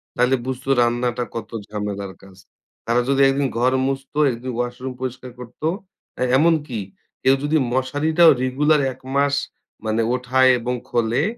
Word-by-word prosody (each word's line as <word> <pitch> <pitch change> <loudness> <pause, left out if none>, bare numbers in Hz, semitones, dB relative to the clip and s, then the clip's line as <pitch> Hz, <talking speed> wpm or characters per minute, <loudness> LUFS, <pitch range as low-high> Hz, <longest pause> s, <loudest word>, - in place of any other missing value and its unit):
তাইলে 125 +2 +3
বুঝতো 130 +1 -5
রান্নাটা 120 +1 0
কত 115 - -5 0.2
ঝামেলার 100 -2 -5
কাজ। 95 -1 -16 0.5
তারা 120 +1 +2
যদি 140 0 +3
একদিন 135 0 +1
ঘর 125 +2 +2
মুছতো, 135 +1 -4
একদিন 125 +2 -5
ওয়াশরুম 125 +2 -3
পরিষ্কার 130 0 -5
করত? 125 +2 -12 0.6
আ - - -5 0.2
এমনকি 150 -6 +1 0.4
কেউ 135 +1 +5
যদি 150 +2 +2 0.2
মশারিটাও 155 +6 +4
রেগুলার 145 +4 +2
১ 130 - -21 0.2
মাস 140 0 +2 0.5
মানে 110 +1 +1
উঠায় 130 +1 +3
এবং 125 +2 -2
খোলে, 120 +4 +1
130 Hz, 140 wpm, -21 LUFS, 120-140 Hz, 0.6 s, কেউ